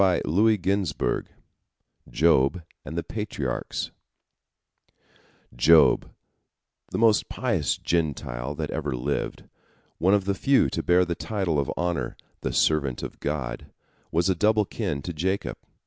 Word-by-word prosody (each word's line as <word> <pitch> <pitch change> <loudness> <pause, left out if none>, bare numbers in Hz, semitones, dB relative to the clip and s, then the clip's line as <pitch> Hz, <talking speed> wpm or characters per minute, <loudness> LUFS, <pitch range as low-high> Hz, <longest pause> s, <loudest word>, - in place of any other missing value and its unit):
III 100 +3 +3
JOB 95 -4 -1 0.8
JOB 75 0 +3 0.2
AND 80 +5 -7
THE 85 - -1
PATRIARCHS 95 - -4 1.6
Job, 80 +5 +5 0.8
the - - -3
most 110 -2 +3
pious - - 0
Gentile 70 -5 -2
that 75 0 -4
ever 75 -4 -2
lived, 65 +4 -3 0.6
one 95 +4 +4
of 100 -2 0
the 100 - +1
few 135 +8 +3
to - - -1
bear 90 +1 +4
the 85 - -2
title 90 -4 -1
of 70 - -1
honor 85 -8 -2 0.2
"the - - -3
servant 70 -5 +1
of - - -7
God," 70 -4 -3 0.4
was 85 +2 +2
of 95 -3 0
double 105 +1 +3
kin 70 -6 -3
to 85 - -4
Jacob. 95 +6 -2
85 Hz, 130 wpm, -26 LUFS, 70-95 Hz, 1.6 s, Job